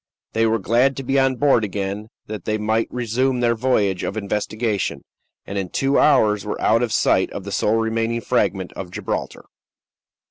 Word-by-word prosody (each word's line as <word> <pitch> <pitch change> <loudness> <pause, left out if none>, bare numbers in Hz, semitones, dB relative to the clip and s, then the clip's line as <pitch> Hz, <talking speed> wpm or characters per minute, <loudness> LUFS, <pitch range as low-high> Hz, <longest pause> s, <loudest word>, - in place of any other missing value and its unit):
They 115 0 +2
were 110 +1 +2
glad 120 +7 +2
to 135 - -4
be 135 +1 +1
on 135 -1 +2
board 135 -4 +3
again, 100 +1 -4 0.2
that 105 -4 -7
they 110 0 0
might 110 +1 0
résumé 125 +2 0
their 120 -1 +3
voyage 110 -6 +1
of - - -3
investigation, 105 +1 -2 0.4
and 100 0 -3
in 95 -2 -4
two 135 +1 +1
hours 105 -8 +4
were 105 - -4
out 115 +2 +3
of 120 -2 -1
sight - - +2
of - - -5
the - - -7
sole 110 +2 +1
remaining 115 +1 -1
fragment 100 -7 0
of 95 - -7
Gibraltar. - - -4
110 Hz, 180 wpm, -21 LUFS, 105-125 Hz, 0.4 s, hours